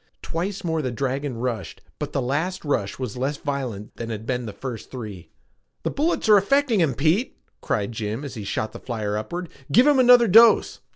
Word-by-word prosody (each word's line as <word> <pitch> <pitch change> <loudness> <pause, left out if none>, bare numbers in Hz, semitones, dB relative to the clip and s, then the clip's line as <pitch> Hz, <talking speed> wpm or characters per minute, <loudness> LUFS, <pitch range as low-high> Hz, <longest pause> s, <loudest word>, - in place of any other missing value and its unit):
Twice 185 +5 -3
more 160 -2 0
the 130 - -2
dragon 135 +1 -2
rushed 115 -6 -4 0.2
but - - -4
the 135 - -1
last 160 +8 -2
rush 100 -9 -1
was 125 -4 -5
less 135 +3 -1
violent 130 -9 -5
than 115 -1 -5
had 110 -1 -5
been 125 -1 -2
the - - -5
first 115 +3 -7
three. 105 -9 -8 0.5
"The - - -1
bullets 310 -3 0
are 210 -1 +8
affecting 245 +2 +2
him, 155 -7 +2
Pete!" 165 - +1 0.2
cried 100 +1 -1
Jim 110 +4 -4
as 140 - -7
he 110 -5 -6
shot 110 +2 -3
the - - -9
flyer 110 -4 -3
upward. 170 +12 -4 0.2
"Give 245 - +6
him 290 -2 +5
another 245 -1 +7
dose!" 225 +3 +6
135 Hz, 195 wpm, -23 LUFS, 115-185 Hz, 0.5 s, are